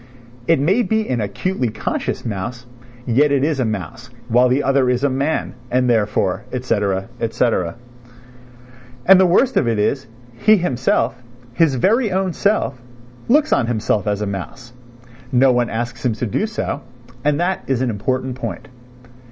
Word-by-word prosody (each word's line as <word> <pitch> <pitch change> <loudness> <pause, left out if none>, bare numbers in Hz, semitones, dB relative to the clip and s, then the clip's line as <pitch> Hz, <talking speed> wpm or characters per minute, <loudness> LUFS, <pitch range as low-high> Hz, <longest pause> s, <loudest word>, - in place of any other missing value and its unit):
It 165 -3 +4
may 185 - +2
be 220 0 0
an 120 -3 -1
acutely 125 - -2
conscious 110 0 -3
mouse, 120 +3 -4 0.4
yet 140 +5 +3
it 140 -1 +2
is 150 -2 0
a 130 - +1
mouse, 110 +3 -5 0.2
while 125 +2 +4
the 130 +3 +2
other 135 -2 +2
is 125 +1 0
a 140 - +2
man, 140 +4 -1 0.2
and 125 0 +2
therefore, 105 -5 +1
et 125 -1 -3
caetera, 100 -5 0
et 115 -1 -2
caetera. 110 -8 0 1.3
And 190 0 +8
the 190 - +5
worst 245 +9 +3
of - - +2
it 115 -2 +1
is, 130 +5 0 0.3
he 170 - +4
himself, 125 -6 0 0.3
his 150 0 +3
very 215 - +2
own 190 -1 0
self, 200 - 0 0.5
looks 300 +5 +3
on 115 - +2
himself 110 -2 0
as 105 0 0
a - - -1
mouse; 105 +5 -7 0.6
no 130 +1 +5
one 120 -1 +1
asks 120 +2 -4
him 125 -3 +1
to 110 +3 -3
do 120 - -1
so; 210 -9 -3 0.4
and 145 0 +1
that 180 +2 -1
is 130 -2 0
an 125 - 0
important 130 +5 -2
point. 135 +2 -6
125 Hz, 170 wpm, -19 LUFS, 115-155 Hz, 1.3 s, And